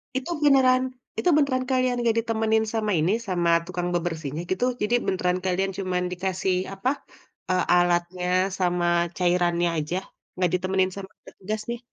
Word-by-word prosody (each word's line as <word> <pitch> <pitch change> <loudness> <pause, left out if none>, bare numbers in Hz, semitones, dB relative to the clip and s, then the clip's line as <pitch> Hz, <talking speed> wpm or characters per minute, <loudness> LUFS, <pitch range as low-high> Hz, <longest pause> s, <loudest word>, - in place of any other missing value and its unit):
Itu 265 +6 -3
beneran 260 -3 +5 0.4
itu 360 - +2
beneran 260 -3 +1
kalian 255 -1 +2
enggak 230 -1 +1
ditemenin 220 -1 +1
sama 215 -2 0
ini, 165 +5 +2 0.2
sama 175 -2 +1 0.2
tukang 175 0 -3
bebersihnya, 160 -3 -3
gitu? 215 +7 +1 0.2
Jadi, 210 +3 0
beneran 180 -1 0
kalian 190 +1 0
cuman 185 -2 -1
dikasih 185 0 -1 0.2
apa, 195 +6 -1 0.6
eee, 185 -1 +2
alatnya 175 0 +1 0.3
sama 175 -1 +1 0.3
cairannya 175 -1 +2
aja, 170 +5 -3 0.4
enggak 180 -2 +1
ditemenin 185 +1 +1
sama 195 -1 -7 0.2
petugas, 210 +3 -5
nih? 235 - -3
185 Hz, 145 wpm, -25 LUFS, 175-220 Hz, 0.6 s, beneran